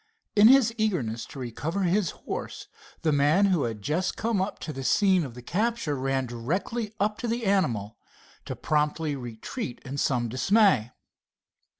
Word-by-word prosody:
In 210 Hz, +1 st, +8 dB
his 250 Hz, -3 st, +6 dB
eagerness 135 Hz, -, -1 dB
to -, -, -11 dB
recover 145 Hz, -, -3 dB
his 180 Hz, 0 st, +2 dB, 0.2 s
horse, -, -, -5 dB, 0.4 s
the 155 Hz, -, +3 dB
man 150 Hz, +7 st, +4 dB
who 180 Hz, -8 st, +2 dB
had 110 Hz, -3 st, -5 dB
just 170 Hz, -, -1 dB
come 225 Hz, -3 st, 0 dB
up 190 Hz, -, -3 dB
to 155 Hz, -, -5 dB
the 135 Hz, 0 st, -6 dB
scene 190 Hz, +4 st, +3 dB
of 130 Hz, -5 st, -7 dB
the 125 Hz, -, -10 dB
capture 215 Hz, -, -1 dB
ran 135 Hz, 0 st, -1 dB
directly 180 Hz, -, -3 dB
up 210 Hz, +2 st, 0 dB
to 240 Hz, -, -3 dB
the 235 Hz, 0 st, -2 dB
animal 115 Hz, -, 0 dB, 0.5 s
to -, -, -5 dB
promptly 150 Hz, 0 st, 0 dB
retreat 120 Hz, -, -6 dB
in 140 Hz, +1 st, -4 dB
some 125 Hz, -4 st, +1 dB
dismay. 130 Hz, -, +3 dB
155 Hz, 165 wpm, -27 LUFS, 130-205 Hz, 0.5 s, In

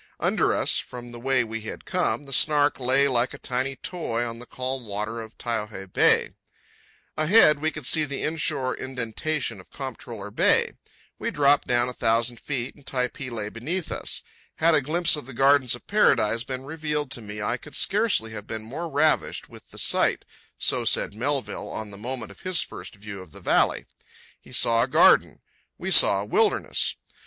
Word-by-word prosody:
Under -, -, +2 dB
us, -, -, +1 dB
from 120 Hz, -, -8 dB
the 120 Hz, -, -9 dB
way 130 Hz, 0 st, +2 dB
we 115 Hz, 0 st, -5 dB
had 110 Hz, -, -8 dB
come, 180 Hz, -5 st, 0 dB
the 135 Hz, -1 st, -8 dB
Snark 145 Hz, +1 st, +3 dB
lay 130 Hz, +2 st, +3 dB
like 125 Hz, -2 st, 0 dB
a -, -, -9 dB
tiny 130 Hz, +2 st, -2 dB
toy 135 Hz, -9 st, -3 dB
on 115 Hz, -1 st, -5 dB
the 125 Hz, -, -9 dB
calm 130 Hz, -1 st, -4 dB
water 105 Hz, +3 st, -3 dB
of 110 Hz, 0 st, -11 dB
Taiohae 105 Hz, -5 st, -4 dB
Bay. -, -, +4 dB, 0.9 s
Ahead 155 Hz, -2 st, +6 dB
we 155 Hz, +1 st, +1 dB
could 150 Hz, -3 st, -8 dB
see 155 Hz, +5 st, +5 dB
the 140 Hz, -2 st, -3 dB
inshore 155 Hz, -5 st, 0 dB
indentation 130 Hz, 0 st, -3 dB
of -, -, -22 dB
Comptroller 115 Hz, -6 st, -7 dB
Bay. -, -, +3 dB, 0.5 s
We -, -, -2 dB
dropped 145 Hz, 0 st, +3 dB
down 120 Hz, -1 st, +2 dB
a 125 Hz, -, -4 dB
thousand 115 Hz, 0 st, +1 dB
feet, 130 Hz, -3 st, -3 dB
and 145 Hz, -, -20 dB
Typee 125 Hz, 0 st, -3 dB
lay 110 Hz, -3 st, -4 dB
beneath 155 Hz, +11 st, -4 dB
us. -, -, -2 dB, 0.3 s
"Had 165 Hz, +1 st, +3 dB
a 150 Hz, -, +4 dB
glimpse 165 Hz, +5 st, +2 dB
of 150 Hz, -4 st, -7 dB
the 135 Hz, -, -8 dB
gardens 135 Hz, -1 st, +4 dB
of 120 Hz, -, -14 dB
paradise 115 Hz, -, +3 dB
been 130 Hz, +1 st, -5 dB
revealed 150 Hz, -2 st, -3 dB
to 120 Hz, -, -5 dB
me 105 Hz, 0 st, -8 dB
I 110 Hz, +4 st, -1 dB
could 150 Hz, -, -12 dB
scarcely 200 Hz, -, +2 dB
have 105 Hz, -1 st, -8 dB
been 110 Hz, -1 st, -5 dB
more 155 Hz, +10 st, -5 dB
ravished 155 Hz, +2 st, +1 dB
with -, -, -14 dB
the -, -, -13 dB
sight"—so -, -, 0 dB
said -, -, +1 dB
Melville 135 Hz, +5 st, -3 dB
on 110 Hz, -1 st, -6 dB
the -, -, -10 dB
moment 120 Hz, 0 st, -6 dB
of 100 Hz, -, -16 dB
his 185 Hz, -2 st, 0 dB
first -, -, -8 dB
view 100 Hz, -1 st, -8 dB
of 85 Hz, -5 st, -14 dB
the -, -, -11 dB
valley. -, -, +2 dB, 0.5 s
He -, -, -18 dB
saw 115 Hz, 0 st, +3 dB
a 125 Hz, -, +2 dB
garden. 130 Hz, -, +4 dB, 0.4 s
We -, -, -4 dB
saw 100 Hz, -, +6 dB
a -, -, -5 dB
wilderness. -, -, +1 dB
125 Hz, 185 wpm, -25 LUFS, 115-145 Hz, 0.9 s, Ahead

